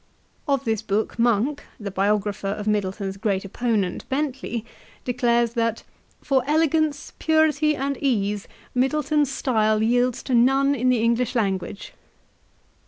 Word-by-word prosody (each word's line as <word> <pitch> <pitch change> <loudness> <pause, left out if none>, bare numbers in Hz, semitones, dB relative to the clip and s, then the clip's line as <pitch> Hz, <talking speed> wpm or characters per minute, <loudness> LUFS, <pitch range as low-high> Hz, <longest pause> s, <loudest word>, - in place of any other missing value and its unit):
Of 275 -2 0
this 220 -2 0
book, 215 +3 -2
Monk, 240 +5 +2 0.2
the 205 -2 -5
biographer 200 +1 0
of 205 +1 -3
Middleton's 195 -1 -1
great 195 -1 -1
opponent, 205 -3 -2
Bentley, 265 -5 -2 0.4
declares 240 -2 +1
that 230 -1 -1 0.4
"for 265 -2 +2
elegance, 310 -1 +1
purity, 310 -1 +3
and 280 0 -2
ease 210 -7 0 0.3
Middleton's 290 +2 +1
style 220 -5 +1
yields 245 +2 +1
to 260 - -3
none 270 +4 +4
in 255 -2 +1
the 240 -3 +2
English 235 +2 +1
language." 195 -3 -2
240 Hz, 125 wpm, -23 LUFS, 210-275 Hz, 0.4 s, none